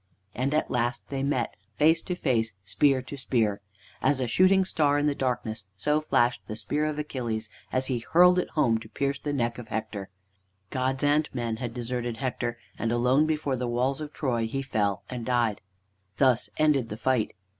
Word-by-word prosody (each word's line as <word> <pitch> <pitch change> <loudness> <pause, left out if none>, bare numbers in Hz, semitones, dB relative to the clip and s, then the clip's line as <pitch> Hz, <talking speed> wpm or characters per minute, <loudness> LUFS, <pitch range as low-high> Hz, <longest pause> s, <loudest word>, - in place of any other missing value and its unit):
And 130 +3 -1
at 155 - 0
last 120 0 -1
they 135 -1 -2
met, 135 -4 0 0.2
face 160 +5 +4
to 180 - -3
face, 115 - 0
spear 135 +4 +2
to 135 - -7
spear. 110 -6 0 0.4
As 135 0 +2
a 130 - +1
shooting 185 +9 +4
star 145 -5 +2
in 145 - +1
the 145 - +2
darkness 120 -5 -2
so 150 +7 +1
flashed 125 -5 +2
the 110 - -4
spear 150 +7 -1
of 155 -1 -2
Achilles 120 -7 -3 0.2
as 130 +1 +1
he 130 -3 -1
hurled 180 +8 +5
it - - -2
home 115 -7 +3
to 110 -1 -12
pierce 140 +2 -1
the 145 - -3
neck 120 -3 -1
of 120 - -8
Hector. 105 -3 -4 0.6
Gods 130 +1 -1
and 150 +1 +3
men 115 -2 -2
had 120 0 -4
deserted 120 -1 -3
Hector, 125 -2 -2 0.2
and 115 - 0
alone 125 +5 +3
before 150 -3 0
the 125 -1 -2
walls 125 +4 0
of 150 -1 -5
Troy 120 -7 -1
he 135 +4 -3
fell 105 -7 0
and 125 -2 -5
died. 120 -4 +1 0.6
Thus 125 -1 +3
ended 145 -6 +3
the 105 - -5
fight. 125 -3 0
130 Hz, 190 wpm, -27 LUFS, 115-145 Hz, 0.6 s, hurled